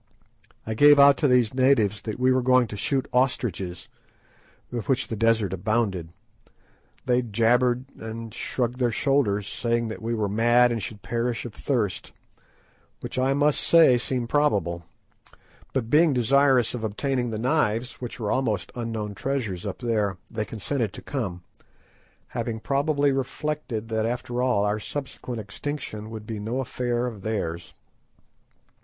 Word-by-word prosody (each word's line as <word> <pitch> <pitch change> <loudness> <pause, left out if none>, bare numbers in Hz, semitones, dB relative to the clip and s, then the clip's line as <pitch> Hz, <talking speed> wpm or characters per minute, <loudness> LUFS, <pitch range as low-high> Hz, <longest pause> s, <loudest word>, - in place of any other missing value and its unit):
I 110 - -2
gave 145 +5 +7
out 140 0 +8
to 150 - +2
these 125 -3 +3
natives 130 -6 +3
that 110 - -5
we 130 +1 +3
were 130 0 +3
going 130 0 +4
to 105 - -6
shoot 135 +6 -1
ostriches, 115 -8 -1 0.8
with 120 +1 -5
which 130 -1 +1
the 115 - -2
desert 110 -3 +2
abounded. 100 -3 -1 1.0
They 125 0 +3
jabbered 120 +2 +2
and 110 0 -7
shrugged 125 +1 -2
their 125 -2 +2
shoulders, 105 -5 +1
saying 115 0 -1
that 110 - -7
we 115 +1 -2
were 105 -2 0
mad 120 +4 +4
and 115 -2 -2
should 105 +3 -7
perish 120 0 -2
of 120 - -7
thirst, 115 -8 -2 0.9
which - - -4
I 135 +1 +2
must 145 +1 +2
say 160 -7 +6
seemed 125 -1 -2
probable; 100 - +1 0.9
but 120 -4 -2
being 155 0 +5
desirous 130 0 +3
of 120 -3 -5
obtaining 120 +3 -1
the 110 - -3
knives, 125 -1 0
which 120 0 -6
were 105 -2 -1
almost 115 -6 -1
unknown 115 -3 -4
treasures 110 -6 -3
up - - -4
there, 105 -6 -1
they 110 -2 -2
consented 115 0 -3
to - - -9
come, 100 -11 -4 0.9
having 115 -2 -3
probably 140 +3 +1
reflected 135 -4 -3
that, 110 0 0
after 125 0 -3
all, 125 -5 +2
our 105 +1 0
subsequent 130 -1 -5
extinction 110 0 -6
would 110 -1 -8
be 110 -1 -5
no 115 +5 -3
affair 120 -1 -1
of 115 -5 -6
theirs. 85 -6 -4
120 Hz, 150 wpm, -25 LUFS, 110-130 Hz, 1.0 s, out